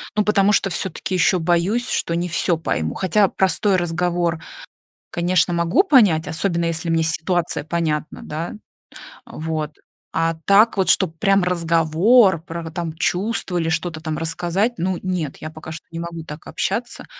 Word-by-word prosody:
ну, 210 - +3
потому 205 -1 +3
что 195 - +2
всё-таки 185 +1 -3
ещё 180 +1 +3
боюсь, 180 +8 +1
что 170 - -1
не 175 +1 -2
всё 170 +1 +1
пойму. 80 - -2
Хотя 195 +2 +2
простой 190 +2 +1
разговор, 175 -1 0 0.7
конечно, 175 0 +1
могу 170 - +3
понять, 210 - +4
особенно 170 +1 -1
если 165 0 -2
мне 165 0 +2
ситуация 160 0 0
понятна, 155 -2 -2
да. 160 +3 -5 0.7
Вот, 155 -1 -4 0.4
а 165 0 0
так 210 +3 +5
вот, 190 - +2
чтоб 165 -4 +2
прям 195 -2 +3
разговор 170 +3 +3
про 165 -1 -6
там 165 -1 -4
чувства 185 +2 -1
или 165 -1 0
что-то 165 0 -2
там 155 -2 -3
рассказать, 175 +7 0
ну 180 +1 -1
нет, 180 -6 -3
я 155 - -7
пока 155 0 -10
что 160 - -8
не 165 - -6
могу 170 -1 -6
так 150 0 -9
общаться, 240 +1 -3
170 Hz, 155 wpm, -21 LUFS, 160-190 Hz, 0.7 s, так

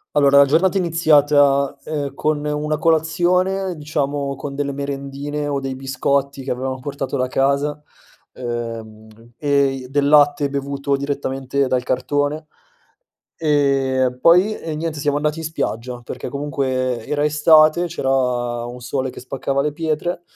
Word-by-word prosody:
Allora, 140 -1 +5
la 140 - +8
giornata 170 +7 +2
è - - +3
iniziata, 145 -5 +3
ehm, 145 -3 -3
con 150 0 -1
una 150 +1 -1
colazione, 180 +4 +1
diciamo 145 -2 -2
con 140 +1 -6
delle 140 0 -2
merendine 140 +1 -4
o 140 -1 -1
dei 135 -1 -4
biscotti 135 +1 -1
che - - -6
avevamo 130 +1 -3
portato 135 0 -4
da 130 - 0
casa, 140 +3 0 0.5
uhm, 115 -3 -6 0.3
e 140 -1 +2
i 135 -2 -3
del 140 +1 +1
latte 145 -1 +4
bevuto 140 0 -2
direttamente 140 -1 -2
dal 125 -1 0
cartone, 145 +4 -1 0.9
ehm, 135 -4 +1
poi 180 +7 +5
e 160 -2 -5
niente 155 -1 -3
siamo 145 0 0
andati 150 +2 -1
in 160 - -5
spiaggia, 125 -6 -3
perché - - -6
comunque 130 -4 -2
era 150 0 0
estate, 155 +3 +5
c'era 160 -5 -3 0.6
un 120 +1 -8
sole 130 +2 -3
che - - -10
spaccava 135 +2 -2
le 150 +1 -1
pietre 165 +2 -2
140 Hz, 145 wpm, -20 LUFS, 135-150 Hz, 0.9 s, la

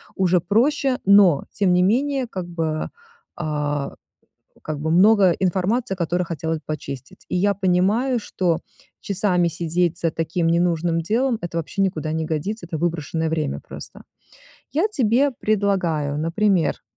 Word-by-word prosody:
уже 180 -1 +3
проще, 255 - +2
но 195 -6 +5
тем 195 -3 +2
не 180 0 +4
менее, 265 +6 +1
как 185 -4 -5
бы, 160 -3 -2 0.5
э, 150 -2 -2 0.7
как 155 -1 -4
бы 160 +1 -2
много 195 +2 +5
информации, 195 +5 0
которую 175 +1 -1
хотелось 160 -1 -3
почистить. 140 -4 -7
И - - -1
я 200 +3 +2
понимаю, 200 +7 +1
что 180 -5 -1 0.4
часами 180 -3 +1
сидеть 170 +1 -1
за 165 - +1
таким 165 +2 -1
ненужным 170 0 +1
делом- 230 +7 0
это 170 -1 -5
вообще 165 +4 -2
никуда 160 -5 -1
не 160 0 -2
годится, 170 +6 -3
это 165 - -4
выброшенное 165 -1 -1
время 155 -3 -2
просто. - - -11 0.7
Я 330 +9 +2
тебе 270 - +2
предлагаю, 180 -9 0
например, 170 +2 +1
175 Hz, 140 wpm, -22 LUFS, 160-205 Hz, 0.7 s, но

